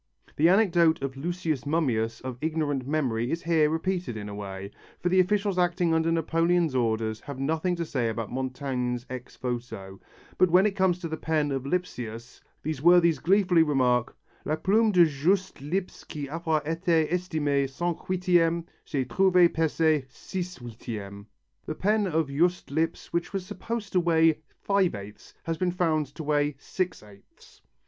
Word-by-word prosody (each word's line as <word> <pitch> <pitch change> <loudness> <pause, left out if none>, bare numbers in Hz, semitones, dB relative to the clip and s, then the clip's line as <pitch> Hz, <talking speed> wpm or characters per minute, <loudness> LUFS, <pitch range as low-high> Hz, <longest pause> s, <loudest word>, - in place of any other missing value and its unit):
The 160 +3 +4
anecdote 175 -5 +4
of 135 -1 -3
Lucius 160 -3 -3
Mummius 120 -8 0
of 130 -2 -6
ignorant 150 -4 -1
memory 125 -6 0
is 165 +3 -2
here 160 -3 +3
repeated 170 -5 -2
in 105 -1 -6
a - - -7
way, 100 -1 -7 0.3
for 175 - 0
the 185 +1 +3
officials 200 0 +2
acting 175 -1 +2
under 160 0 +2
Napoleon's 165 0 +1
orders 110 -3 0
have 140 -2 -8
nothing 160 +6 0
to 170 -1 -3
say 125 -7 -1
about 110 -1 -4
Montaigne's 130 -1 -3
ex 125 -1 -8
voto, 120 -6 -5 0.4
but 185 - +5
when 180 +4 +5
it 205 -2 +1
comes 190 -2 +2
to 170 - -3
the 160 0 -4
pen 155 -3 0
of 135 0 -3
Lipsius 120 -9 -4 0.2
these 155 -3 -3
worthies 170 -1 +5
gleefully 180 -1 +4
remark: 130 -5 +1 0.3
"La 155 - 0
plume 210 +7 +3
de 180 -3 +6
Juste 170 +4 0
Lipse 180 +6 -3
qui 145 -2 -6
avoit 160 0 -1
été 165 0 +1
estimée 150 -6 0
cinq 170 +5 -2
huitièmes, 175 -2 +2 0.2
c'est 135 -3 -2
trouvée 180 +4 +4
peser 160 -2 +1
six 180 +5 -6
huitièmes" 110 -4 -8 0.4
(the 155 - -3
pen 210 +3 +1
of 160 -2 +1
Juste 170 +4 0
Lipse 160 +3 -2
which 170 +3 -2
was 195 -2 -3
supposed 210 +2 -5
to 185 - +4
weigh 165 -2 +3 0.2
five 195 - +2
eighths, 100 +1 -11
has 165 -1 -3
been 185 - +1
found 160 -4 +1
to 150 +4 -9
weigh 145 -1 +1
six 180 - -3
eighths). 100 -1 -19
160 Hz, 165 wpm, -27 LUFS, 130-175 Hz, 0.4 s, de